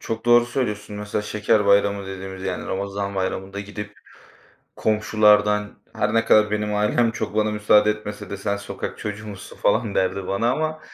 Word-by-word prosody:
çok 115 0 -5
doğru 120 0 +5
söylüyorsun. 105 -5 -3
Mesela 105 0 -3
Şeker 105 0 +1
Bayramı 100 0 +3
dediğimiz, 95 0 -7
yani 95 - -3
Ramazan 100 +1 -3
Bayramı'nda 95 +1 -3
gidip 105 0 -7 0.8
komşulardan 105 -1 +2 0.2
her 105 +1 0
ne 115 0 +3
kadar 105 -1 +5
benim 105 0 -1
ailem 105 +3 +2
çok 110 - -4
bana 110 0 +2
müsaade 105 0 +4
etmese 105 -1 -6
de 100 - -4
"Sen 100 0 -2 0.4
çocuğu 105 +1 -6
musun?" 100 -3 -9
falan 110 -3 +1
derdi 95 0 0
bana 115 +5 +1
ama 155 +2 -2
105 Hz, 160 wpm, -23 LUFS, 100-110 Hz, 0.8 s, doğru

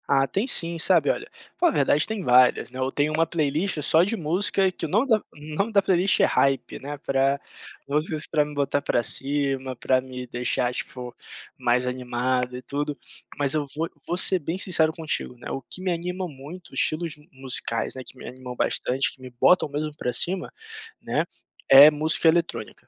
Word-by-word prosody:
Ah, 135 -1 +3
tem 195 - -1
sim, 170 -8 +1
sabe. 165 -4 +4
Olha, 425 - -5 0.3
pô, 355 - +3
a - - +3
verdade 145 - +2
tem 220 -3 -4
várias, 125 -1 +4
né, 130 - -8
eu 130 +1 -1
tenho 150 +1 0
uma 165 +1 +2
playlist 155 +2 -1
só 160 +3 +4
de 215 +5 -1
música 185 +3 +1
que 175 - -5
o - - -5
nome 215 - +2
da 225 -4 +5
o 150 -4 -11
nome 200 +7 0
da 200 -2 +4
playlist 190 0 +2
é - - +6
Hype, 135 -3 +1
né, 145 +2 -6
pra 135 0 +1 0.5
músicas 150 +2 -1
para 150 -2 +2
me 150 0 -8
botar 145 0 0
para 120 - +1
cima, 135 -1 -1
para 130 +1 +1
me 125 -1 -8
deixar, 125 +1 -1
tipo, 125 -1 -6 0.4
mais 125 +1 +1
animado 125 0 -1
e - - -8
tudo. 145 +3 -3 0.4
Mas 140 -1 +1
eu 155 -1 +1
vou 165 +2 -2 0.2
vou 175 - -1
ser 185 0 +4
bem 165 +3 -4
sincero 170 -5 +2
contigo, 160 -6 -4
né, 120 - -9
o 135 - -4
que 185 - -8
me 185 -1 -1
anima 180 +2 -3
muito 155 +5 -11
estilos 165 +1 0
de 150 +3 -19
musicais, 130 -4 -3
né, 130 - -6
que - - -8
me - - -10
animam 125 0 -8
bastante, 130 +2 0
que 130 - -16
me 130 - -9
botam 150 +7 +3
mesmo 150 +2 -3
para 125 - -2
cima, 180 +8 -1 0.5
né, - - -1 0.4
é 140 +2 +11
música 155 +2 +1
eletrônica. 170 +1 0
145 Hz, 200 wpm, -24 LUFS, 130-170 Hz, 0.5 s, é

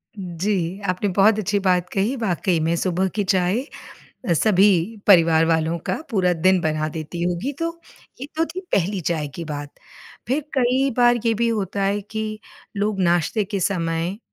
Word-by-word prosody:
जी, 185 0 -2
आपने 185 +3 0
बहुत 210 +2 +4
अच्छी 205 0 0
बात 180 -2 +1
कही, 205 +7 0
वाक़ई 180 -5 0
में 165 +2 +1
सुबह 185 +2 0
की 205 - +1
चाय 185 +3 +1 0.7
अ, - - +4
सभी 200 +2 +3
परिवार 165 -4 +6
वालों 165 0 +1
का - - +1 0.2
पूरा 185 -4 +2
दिन 185 +3 +3
बना 155 0 -1
देती 160 +2 -6
होगी 180 +10 -1
तो, 335 0 -3 0.4
ये - - -3
तो 325 +1 +1
थी 355 +3 -6
पहली 190 +1 0
चाय 155 -3 -1
की 170 - -5
बात। 145 -1 -6 0.6
फिर 275 +5 0 0.2
कई 260 +2 +2
बार 240 0 +5
ये 230 - +3
भी 235 +2 0
होता 200 -3 -2
है 200 +1 0
कि 215 +1 -5 0.4
लोग 205 -1 -1
नाश्ते 175 +4 +1
के 200 0 -4
समय 170 0 -1
190 Hz, 170 wpm, -22 LUFS, 170-215 Hz, 0.7 s, परिवार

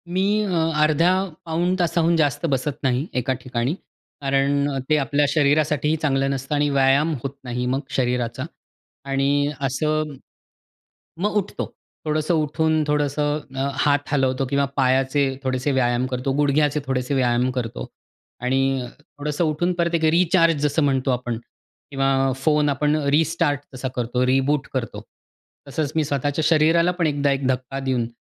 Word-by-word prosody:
मी 190 - +2 0.2
अ, 205 - -2 0.3
अर्ध्या 155 +4 +3 0.3
पाऊण 170 +3 0
तासाहून 170 -1 +2
जास्त 145 0 +1
बसत 135 +1 -1
नाही, 130 +2 +1
एका 130 +1 0
ठिकाणी. 125 +2 -2 0.5
कारण 140 +1 +1
अ, 135 - -3
ते 155 - +4
आपल्या 145 +1 +1
शरीरासाठी 150 0 +2
चांगलं 135 -2 +1
नसतं 135 +2 -3
आणि 145 0 +2
व्यायाम 140 +3 +3
होत 135 0 -3
नाही 125 0 -3
मग 135 - 0 0.2
शरीराचा 125 -1 -1 0.7
आणि 140 +1 +1
असं 155 +3 -1 1.1
मग 210 +1 0
उठतो. 200 -1 -2 0.4
थोडंसं 155 +2 0
उठून 155 0 +1
थोडंसं 150 0 0 0.2
अ, 135 +1 -1 0.2
हात 145 0 +1
हलवतो, 135 -1 +1
किंवा 140 +2 +1
पायाचे 135 +1 +2 0.2
थोडेसे 130 +2 -1
व्यायाम 125 -1 +1
करतो, 125 +2 -1
गुडघ्याचे 145 +1 +2
थोडेसे 130 +1 -1
व्यायाम 125 -1 +2
करतो 115 - -4 0.5
आणि 135 0 0
थोडंसं 150 +1 -4
उठून 170 +3 0
परत 170 -1 0
एक 160 - +1
रिचार्ज 165 -3 +3
जसं 150 +1 +1
म्हणतो 135 -1 +1
आपण. 120 -2 -2 0.5
किंवा 135 -1 +1
फोन 150 +2 +2
आपण 150 +2 +1 0.2
रिस्टार्ट 160 -2 +1
जसा 130 +1 -4
करतो, 125 +1 0
रिबूट 135 +2 +1
करतो. 125 -3 -3 0.7
तसंच 145 +1 -2
मी 160 - +2
स्वतःच्या 145 +1 -1
शरीराला 165 +2 +4
पण 175 -2 0
एकदा 145 -1 +1
एक 135 -1 -1
धक्का 130 +1 -2
देऊन, 130 -3 -1
140 Hz, 145 wpm, -22 LUFS, 130-155 Hz, 1.1 s, ते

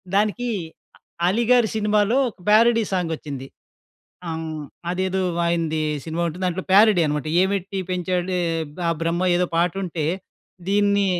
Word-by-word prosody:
దానికి 215 +4 +1 0.8
అలీ 215 +6 +2
గారి 245 -3 +5
సినిమాలో, 210 +2 +2
ఒక 215 - -18
ప్యారడీ 230 +2 +5
సాంగొచ్చింది. 155 -7 -3 0.8
ఆహ్, 160 -1 -4 0.3
అదేదో 185 +1 -1 0.3
ఆయనది 165 -2 0 0.2
సినిమా 165 +1 -3
ఉంటుంది. 180 +4 -5
దాంట్లో 180 +1 -2
ప్యారడీ 205 -2 +6
అనమాట 150 0 -2
"ఏమెట్టి 195 0 -1
పెంచాడే 180 0 -1 0.5
ఆ - - +3
బ్రహ్మ' 170 +2 0
ఏదో 180 0 +1
పాట 170 +1 +2
ఉంటే, 165 -3 -3 0.6
దీన్ని 200 0 +3
185 Hz, 125 wpm, -22 LUFS, 165-205 Hz, 0.8 s, ప్యారడీ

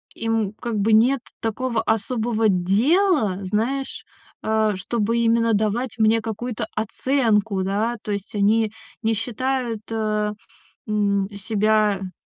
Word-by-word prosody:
им 225 -3 -1
как 225 -1 -3
бы 215 +2 +2
нет 245 +5 +5 0.2
такого 230 +1 -1
особого 225 0 0
дела, 215 - +2
знаешь, 230 +8 -2 0.4
э, 220 -1 +1
чтобы 225 +4 -1
именно 230 0 +3
давать 220 +4 0
мне 225 0 +3
какую-то 225 +1 -4
оценку, 220 -3 +1
да. 215 +5 -1
То 210 - -4
есть 200 -1 -5
они 215 +2 +2 0.3
не 225 0 +1
считают, 240 +1 -2
э, 215 -1 0 0.5
м, 200 -2 +1
себя, 210 0 +1
м, 185 -1 -7
220 Hz, 120 wpm, -22 LUFS, 210-235 Hz, 0.5 s, нет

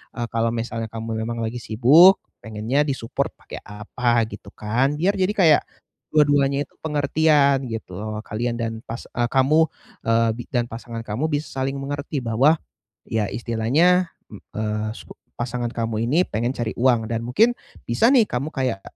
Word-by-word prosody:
eee, 120 -1 -3
kalau 115 0 +1
misalnya 115 -1 -3
kamu 115 0 -4 0.2
lagi 115 +2 -3
sibuk, 140 - +6 0.2
pengennya 110 +6 0
di-support 125 -4 -2
pakai - - -10
apa, 115 +3 0
gitu 105 -1 -11
kan. 120 +6 0
Biar 195 +4 +2
jadi 190 0 +1
kayak 165 -8 +5 0.5
dua-duanya 145 -2 +3
itu - - -20
pengertian, 145 -2 +2
gitu 115 -5 -6
loh. 110 0 -5
Kalian 120 +2 -3
dan 115 -1 -3
pas 115 +2 -6
a 120 -1 0
kamu, 140 +6 +3 0.4
eee, 115 0 +3
bi 120 - -5
dan 120 -2 0
pasangan 115 0 -7
kamu 115 +8 -2
bisa 150 -1 -3
saling 135 +1 -1
mengerti 140 0 -4
bahwa, 125 +8 +4 0.5
ya 110 -3 -1
istilahnya, 145 +11 +2 0.2
m 105 - -13
eee, 110 0 -2
subo - - -12 0.2
pasangan 120 0 -2
kamu 115 -2 -2
ini 175 +5 +4
pengen 115 +3 -1
cari 115 -2 -3
uang 120 -3 +2
dan 115 +1 -2
mungkin 215 - +3 0.3
bisa 120 - +3
nih, 245 -6 +5
kamu 135 +1 -3
kayak 130 -9 -2
120 Hz, 160 wpm, -22 LUFS, 115-145 Hz, 0.5 s, sibuk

